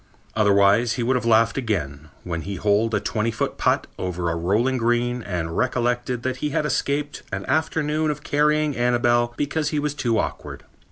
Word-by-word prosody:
Otherwise, 105 +2 +4
he 120 - -2
would 130 +3 +1
have 125 -2 -1
laughed 115 +2 +3
again, 80 - -3
when 85 -1 -4
he 100 +3 -5
holed 105 +3 +1
a - - +2
twenty 110 +2 -1
foot 115 - -3
putt - - +2
over 90 -2 -2
a - - -2
rolling 105 +10 +1
green 120 +1 0
and 85 -5 -4
recollected 120 -1 0
that 130 0 -2
he 150 +3 -2
had 150 - -1
escaped 145 0 -1
an 95 0 -4
afternoon 155 -1 0
of 150 -1 -4
carrying 150 0 +1
Annabel 120 0 +2
because 150 +1 -1
he 150 - -2
was 145 0 -1
too 120 -6 0
awkward. - - -4
120 Hz, 180 wpm, -23 LUFS, 105-140 Hz, -, Otherwise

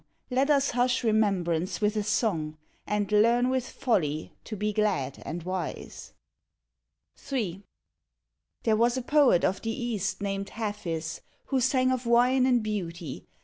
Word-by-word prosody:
let 265 +3 +2
us 280 -2 +3
hush 245 +1 +1
remembrance 195 -6 +1
with 210 0 +1
a 210 - +1
song, 190 -8 -1 0.3
And 210 -1 -1
learn 235 +4 +4
with 260 -1 -1
folly 155 - -1
to 220 - -5
be 210 +1 -1
glad 200 -11 0
and 170 +1 -4
wise. 185 0 -5 1.2
III. 200 -8 -2 1.0
There 220 -2 +3
was 235 +3 +2
a 255 - -2
poet 285 - +4
of 190 +1 0
the 225 - -3
East 220 -5 -2
named 195 0 -3
Hafiz, 195 -8 -4 0.3
Who 265 -2 +1
sang 255 0 +3
of 255 -2 -2
wine 250 +2 +4
and 245 -3 +3
beauty. 170 -8 -5
215 Hz, 145 wpm, -28 LUFS, 185-245 Hz, 1.2 s, learn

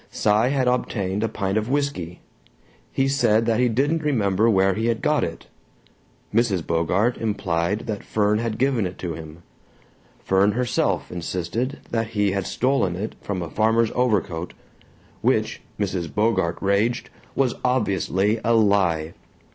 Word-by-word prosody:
Cy 105 +3 +2
had 135 -1 +1
obtained 105 -5 0
a 115 - 0
pint 100 0 -1
of 110 +2 -5
whisky; 135 - -2 0.7
he 135 - +1
said 115 -5 +2
that 115 0 +1
he 125 -1 +3
didn't 145 +8 +1
remember 110 -7 +2
where 95 -2 +3
he 110 +4 -1
had 115 -1 +1
got - - +1
it; - - -5 0.9
Mrs. 105 -7 +1
Bogart 90 +8 +1
implied 100 -2 -1
that 105 -3 -5
Fern 105 0 +1
had 115 -2 -2
given 125 -6 +1
it 90 - -9
to 85 -3 -4
him; 80 +1 -10 0.8
Fern 95 +2 +3
herself 125 -1 0
insisted 90 - -3
that 115 -1 0
he 100 -1 +3
had 100 -1 -2
stolen 125 -9 +1
it 105 +5 -4
from 95 -3 -3
a 85 - -6
farmer's 110 +1 +2
overcoat 100 -9 0 0.7
which, - - +1 0.2
Mrs. 90 -5 -2
Bogart 100 -6 +1
raged, 100 +5 +1 0.2
was 130 -3 +2
obviously 105 -4 +1
a 115 - +3
lie. 95 -7 +2
105 Hz, 145 wpm, -23 LUFS, 95-120 Hz, 0.9 s, he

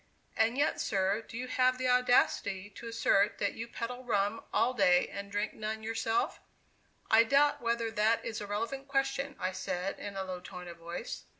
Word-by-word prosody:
"And 225 +3 +2
yet, 290 +2 +1
sir, 195 +2 +1
do 225 - -9
you 250 +1 -4
have 255 0 +2
the 255 0 -1
audacity 245 -5 +2
to 230 - -9
assert 230 -3 +2
that 200 - 0
you 230 - -6
peddle 245 +2 -5
rum 205 -2 0
all 235 +4 +2
day, 180 -7 +4
and 200 0 -7
drink 205 +1 -1
none 220 0 -4
yourself?" 225 +1 -1 0.7
"I 225 +1 +8
doubt 280 +4 +3
whether 230 -1 0
that 220 +1 +2
is 225 -1 -4
a 205 - -5
relevant 230 +7 -3
question," 275 0 -1
I 185 +1 -1
said 185 0 -3
in 205 -1 -6
a 190 - -1
low 185 -1 -5
tone 180 0 -9
of 170 - -9
voice. 170 +7 -6
225 Hz, 190 wpm, -31 LUFS, 200-250 Hz, 0.7 s, I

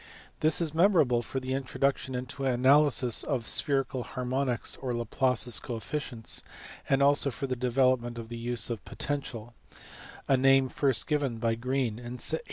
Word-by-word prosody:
TJiis 155 +2 +3
is 160 -3 0
memorable 160 -9 +3
for 130 - -4
the 130 0 -4
introduction 135 0 -1
into 125 +2 -5
analysis 130 -1 +3
of 130 -6 -2
spherical 135 -1 0
harmonics 125 +1 -2
or 125 -2 -3
Laplace 125 +1 +1
s 120 - +4
coefficients, 120 0 -4 0.5
and 140 0 +3
also 140 0 +4
for 135 - -4
the 130 -1 -2
development 125 -1 +1
of 115 -1 -7
the 120 - -7
use 120 0 -1
of 115 - -5
the - - -14
potential; 120 -5 -4 0.7
a 135 - +4
name 135 0 +4
first 135 -5 0
given 145 -6 -1
by 115 0 0
Green 120 -1 -2
in 120 +1 -7
1828. 160 +6 0
130 Hz, 165 wpm, -28 LUFS, 120-140 Hz, 0.7 s, s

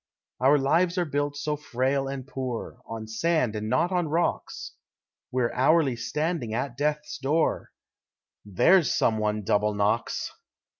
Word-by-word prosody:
Our 135 +3 +5
lives 170 +6 +2
are 175 - +2
built 145 -1 -2
so 150 +1 -1
frail 135 -1 -1
and 135 -1 -5
poor, 130 -3 -5
On 115 -1 -6
sand 125 0 0
and 105 0 -3
not 150 +9 +2
on 180 -3 +1
rocks, 165 +3 -2 0.6
We're 125 -2 0
hourly 135 0 +3
standing 150 -2 -2
at 120 +1 -2
Death's 150 +2 -2
door 150 +4 0 0.7
There's 145 - +4
some 110 -1 +2
one 105 0 -1
double 105 +2 +1
knocks. 105 +3 0
135 Hz, 140 wpm, -26 LUFS, 115-150 Hz, 0.7 s, Our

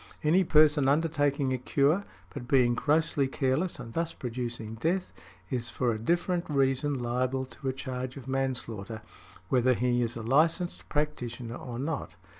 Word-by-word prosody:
Any 170 +5 +4
person 150 -4 +5
undertaking 145 -2 +2
a 130 - -1
cure, 145 +9 +2 0.3
but 125 -4 -7
being 125 -2 +4
grossly 150 +1 +2
careless 135 +6 0
and 120 -3 -8
thus 165 0 -2
producing 120 -3 -4
death, 170 - -1 0.4
is 120 -2 -2
for 125 -1 0
a 110 - -3
different 170 +7 0
reason 135 0 +1
liable 125 +2 -1
to 130 +1 -9
a - - +2
charge 130 0 -5
of 135 - -9
manslaughter, 120 -5 -2 0.5
whether 125 0 +3
he 120 +1 +1
is 120 0 -1
a 115 - -5
licensed 165 +8 +1
practitioner 125 -6 -2
or 120 -1 -6
not. 145 +3 -3
130 Hz, 155 wpm, -29 LUFS, 120-150 Hz, 0.5 s, person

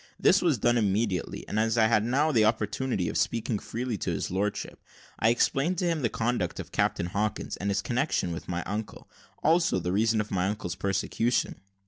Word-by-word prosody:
This 195 - +5
was 165 -7 +2
done 120 +2 +2
immediately; 100 -3 -1
and, 110 - -1
as 110 +1 +1
I 110 - +5
had 110 -1 +3
now 140 +7 +2
an 115 -6 +4
opportunity 110 -1 0
of - - -2
speaking 115 -2 0
freely 115 -1 -4
to - - -2
his - - -2
lordship, 100 +2 -3 0.4
I 110 - +4
explained 135 +8 +1
to 180 - 0
him 165 -3 0
the 120 - +1
conduct 115 -7 -1
of - - -7
Captain - - 0
Hawkins, 105 +4 -2
and 100 - -2
his 100 0 0
connexion 120 - 0
with 85 - -6
my 90 0 -2
uncle; 105 +2 -5 0.4
also 165 - +3
the 90 0 -2
reason 110 +3 +2
of 105 - -3
my 95 -1 +1
uncle's 100 -4 -3
persecution. 100 +5 -1
110 Hz, 195 wpm, -28 LUFS, 100-120 Hz, 0.4 s, This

